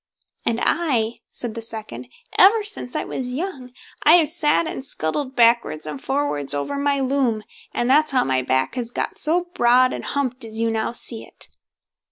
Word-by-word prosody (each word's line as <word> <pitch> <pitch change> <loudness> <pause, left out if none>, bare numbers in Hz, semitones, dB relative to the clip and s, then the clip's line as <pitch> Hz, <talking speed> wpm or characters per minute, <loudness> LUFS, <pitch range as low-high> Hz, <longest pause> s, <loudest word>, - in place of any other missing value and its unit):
"And 230 0 +2
I", 245 -9 0
said 240 -3 -4
the 230 - -6
second, 215 - -7 0.3
"ever 425 +3 +6
since 410 -12 -3
I - - 0
was 250 -1 -5
young, 275 -5 -5 0.3
I 310 - +6
have 325 -4 +4
sat 315 0 +1
and 265 - -5
scuttled 260 - -2
backwards 235 -10 +3
and 150 -3 -5
forwards 265 - +1
over 145 - -3
my 280 0 +1
loom, 260 -5 0 0.3
and 240 - -1
that's 300 +4 +4
how 260 -2 +3
my 130 -1 +1
back 130 +1 0
has 245 -2 -3
got - - -3
so 350 +3 +2
broad 250 +2 +4
and - - -5
humped 260 -3 -2
as 220 -1 -6
you 230 0 +1
now 220 0 -1
see 235 -1 -3
it." - - -6
250 Hz, 185 wpm, -22 LUFS, 225-285 Hz, 0.3 s, ever